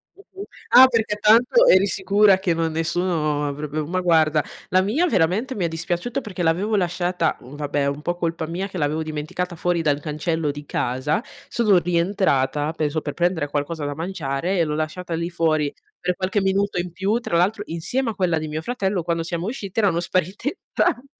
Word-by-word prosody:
Mh-mh, 395 0 -11 0.3
ah 260 +1 +9
perché 225 -4 0
tanto 240 - +5
eri 190 +1 +6
sicura 200 +1 +4
che 190 -3 +1
non 165 0 -1
nessuno 160 -2 0
avrebbe 150 +2 -3
ma 180 +4 -1
guarda, 160 -3 +3 0.3
la 185 - +4
mia 250 - +1
veramente 215 - +1
mi 190 -5 -1
è - - +2
dispiaciuto, 175 - -3
perché 190 -6 -5
l'avevo 185 +7 +1
lasciata 180 -3 0
mhmm, 130 +4 -12
vabbè 145 -1 -2
è - - +1
un 140 +1 -3
po' 175 +2 -2
colpa 165 -2 -2
mia 180 +4 -3
che 190 - -8
l'avevo 155 0 0
dimenticata 155 +4 -4
fuori 175 +1 0
dal 145 -3 +1
cancello 155 0 -2
di 145 0 -9
casa, 130 - -1 0.2
sono 215 -5 +3
rientrata, 170 -5 +1
penso, 155 -1 -1
per 145 - -5
prendere 170 -4 0
qualcosa 145 +2 -3
da 145 0 -3
mangiare 165 0 -2
e - - +4
l'ho 150 -1 -2
lasciata 160 +3 -4
lì 170 +1 -2
fuori, 155 -4 0 0.3
per 180 0 -1
qualche 190 +2 -1
minuto 195 0 +1
in 175 0 -3
più. 195 +6 0
Tra 170 -8 -1
l'altro, 205 +4 +1
insieme 230 +10 -2
a - - -11
quella 180 -4 +1
di 155 0 -3
mio 155 +1 -4
fratello, 195 -4 -1
quando 170 0 -1
siamo 170 +2 -3
usciti 215 -4 -4
erano 190 -6 +2
sparite 185 - -2
entrambe, 255 +3 0
175 Hz, 195 wpm, -22 LUFS, 155-195 Hz, 0.3 s, ah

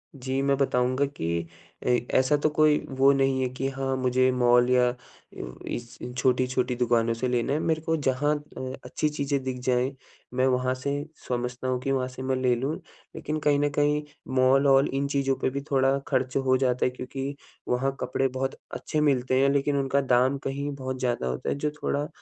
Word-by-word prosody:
जी, 135 0 -2
मैं 140 0 +2
बताऊँगा 130 0 +1
कि 85 - -3 0.4
अ, - - +1 0.3
ऐसा 130 +3 +4
तो 155 - +4
कोई 150 0 +4 0.2
वो 135 +1 +6
नहीं 135 -1 +1
है 130 - +1
कि 135 +1 -2
हाँ, 135 0 -2
मुझे 130 0 +2
मॉल 120 0 +4
या 125 -1 +4
अ, 120 - -5 0.7
इस 120 0 -6 0.2
छोटी-छोटी 125 0 +1
दुकानों 120 -1 +2
से 115 +3 -2
लेना 125 +2 0
है, 150 - +1
मेरे 160 -1 0
को 160 0 0
जहाँ 145 +3 +2 0.2
अ, 130 0 -4
अच्छी 155 - -1
चीज़ें 140 -1 -1
दिख 130 -1 -3
जाएँ, 125 +2 +1 0.4
मैं 130 +1 +2
वहाँ 130 0 +1
से 140 +2 -3 0.3
समझता 125 +1 -3
हूँ 125 -1 0
कि 135 - -1
वहाँ 130 -1 0
से 130 0 -9
मैं 130 0 0
ले 130 -1 +2
लूँ। 135 +6 -2 0.4
लेकिन 155 +1 -3
कहीं 145 -1 +2
न 145 0 +2
कहीं 150 0 +2 0.3
मॉल-ऑल 135 +1 +5
इन 140 +1 0
चीज़ों 135 -1 +1
पे - - +2
भी 140 +2 -4
थोड़ा 135 0 +3
खर्च 130 -2 0
हो 130 -1 +3
जाता 125 -1 +1
है - - +3
क्योंकि 135 +2 -5 0.3
वहाँ 135 +2 0
कपड़े 135 - 0
बहुत 130 +1 -3 0.2
अच्छे 155 - -2
मिलते 130 -3 +2
हैं 140 - +4
लेकिन 140 0 +1
उनका 135 +1 +1
दाम 130 +1 +3
कहीं 140 +2 -3
बहुत 130 -1 -5
ज़्यादा 120 - -1
होता 65 0 -3
है - - 0
जो 150 +1 -2
थोड़ा, 145 +1 0
130 Hz, 195 wpm, -26 LUFS, 125-140 Hz, 0.7 s, वो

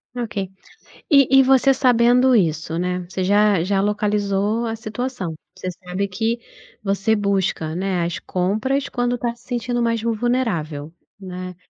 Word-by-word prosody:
Ok. 230 -3 -4 0.7
E 270 -2 +6
e - - +7
você 270 +1 +5
sabendo 250 0 +4
isso, 165 -4 0
né, 180 0 -2
você 185 0 -3
já 205 -2 +3
já 195 +2 +1
localizou 210 +1 0
a 225 - -2
situação. 220 -5 -4 0.2
Você 185 -1 -4
sabe 185 +2 -4
que 225 +5 -1 0.4
você 200 +2 +1
busca, 195 -6 -1
né, 185 -1 -1
as 170 - -3
compras, 220 +10 -1
quando 245 0 -1
tá 235 0 -2
se 240 - -24
sentindo 240 0 -2
mais 230 -1 0
vul 230 0 0
vulnerável, 175 - -1 0.3
né. 185 -1 -7
210 Hz, 150 wpm, -21 LUFS, 185-240 Hz, 0.7 s, e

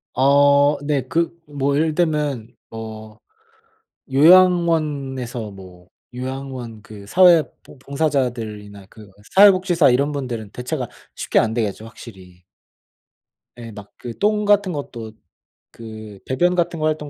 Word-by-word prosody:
어. 140 +2 +4
네. 145 -3 0
그 170 0 -1
뭐 140 -1 -2
예를 155 +1 +1
들면 150 -9 -2
뭐 110 -1 -9 1.0
요양원에서 150 - +2
뭐 90 -2 -14 0.3
요양원 130 -3 -7
그 100 -2 -13
사회 175 - +5 0.2
봉 - - -17
봉사자들이나 120 -9 -3
그 105 -2 -15 0.2
사회복지사 185 -6 +5
이런 140 +4 +1
분들은 120 -7 -5
대체가 125 +2 -5 0.3
쉽게 - - 0
안 110 0 +1
되겠죠 110 -1 -3
확실히. 95 -6 -14 1.1
예. 115 -1 -9
막 105 -1 -12
그 120 -2 -8
똥 210 0 +1
같은 205 -2 +2
것도 115 -6 -7 0.6
그 110 -3 -11
배변 175 +8 +1
같은 170 -2 -1
거 155 - -1
활동 150 -1 -2
135 Hz, 235 characters per minute, -20 LUFS, 110-155 Hz, 1.1 s, 사회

